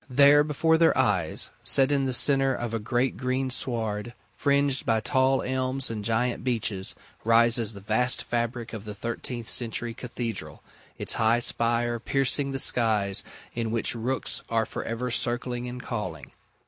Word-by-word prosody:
There 140 +3 +6
before 160 +2 +1
their 165 - +4
eyes, 90 -6 +1
set 135 +1 +4
in 140 -1 +1
the 130 - -1
centre 135 +1 +4
of 120 -1 -4
a 115 - -1
great 120 +4 -1
green 130 0 -1
sward, 115 -2 -3 0.2
fringed 140 -1 +1
by 115 -1 +1
tall 130 +3 +1
elms 130 0 -2
and 105 -2 -5
giant 115 +3 -1
beeches, 110 -6 -2 0.3
rises 115 -1 +3
the 100 - -10
vast 110 +5 +2
fabric 120 0 -3
of 110 -2 -7
the 105 -1 -7
thirteenth 115 +2 -5
century 120 0 -2
Cathedral, 115 - -6 0.3
its - - -3
high 110 +1 +4
spire 120 0 0
piercing 135 +2 +2
the 135 - -3
skies 110 -6 +2 0.3
in 115 -1 -2
which 115 0 0
rooks 120 +3 -2
are 115 -1 +1
for - - -6
ever 120 +2 -3
circling 120 0 -1
and 125 0 -7
calling. 90 - -5
120 Hz, 160 wpm, -26 LUFS, 115-130 Hz, 0.3 s, There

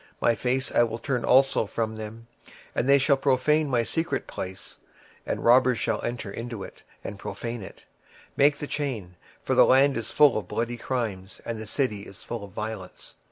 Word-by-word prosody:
26:007:022 - - -36
My 115 - +3
face 125 +3 -1
will 115 -1 +2
I - - -7
turn 125 -5 -1
also 135 -2 +4
from 110 0 -2
them, 110 +1 -8 0.5
and 125 - 0
they 140 - +8
shall 140 +1 +3
pollute 145 +3 +2
my 120 -4 +2
secret 165 +7 -2
place: 95 +1 -7 0.5
for - - 0
the - - -8
robbers 125 0 +5
shall 110 -1 -1
enter 120 -4 -4
into 115 -2 -6
it, - - -11 0.2
and 100 0 -6
defile 115 +2 -5
it. 95 - -11 0.5
26:007:023 - - -36
Make 145 +1 +4
a - - 0
chain: 125 -13 -3 0.3
for - - 0
the - - +7
land 135 +1 +5
is 115 - -4
full 145 -7 +5
of 95 - -10
bloody 120 +4 -2
crimes, 110 -7 -4
and 115 -1 -4
the 110 - -7
city 110 -4 -1
is 100 - -13
full 115 -3 -5
of 100 - -9
violence. 105 -2 -7
120 Hz, 205 wpm, -26 LUFS, 110-135 Hz, 0.5 s, they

